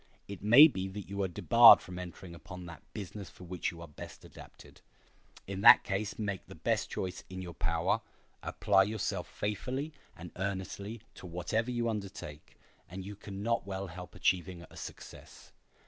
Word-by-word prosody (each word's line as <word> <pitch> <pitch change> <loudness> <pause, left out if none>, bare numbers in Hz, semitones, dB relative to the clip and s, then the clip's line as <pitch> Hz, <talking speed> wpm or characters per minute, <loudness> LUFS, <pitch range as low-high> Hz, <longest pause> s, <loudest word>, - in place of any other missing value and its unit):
It 100 -2 -8
may 120 +10 +9
be 95 -10 -3
that 100 +1 -7
you 100 0 -2
are 95 - +1
debarred 90 - +8
from 90 0 -8
entering 90 0 -8
upon 90 +2 -10
that 85 -2 -10
business 100 -2 -7
for - - -14
which 90 0 -3
you 85 -1 -10
are - - -9
best 75 - -11
adapted. - - -14 0.6
In 95 0 -5
that - - +9
case 100 +1 -2
make 100 -3 -3
the - - -11
best - - 0
choice 90 -1 -4
in 95 0 -6
your 85 -1 -7
power, 85 0 0 0.4
apply 100 -2 +3
yourself 100 -3 -3
faithfully 125 +9 -3 0.2
and 85 +1 -9
earnestly 100 +3 -4
to 90 - -10
whatever 90 +7 -1
you 120 -1 -1
undertake, 100 -9 -6 0.3
and 95 +2 -7
you 100 +1 -7
can 100 -1 -8
not 115 -4 0
well 95 0 -3
help 90 +1 -10
achieving 90 -1 0
a - - -14
success. - - -10
95 Hz, 175 wpm, -32 LUFS, 90-105 Hz, 0.6 s, may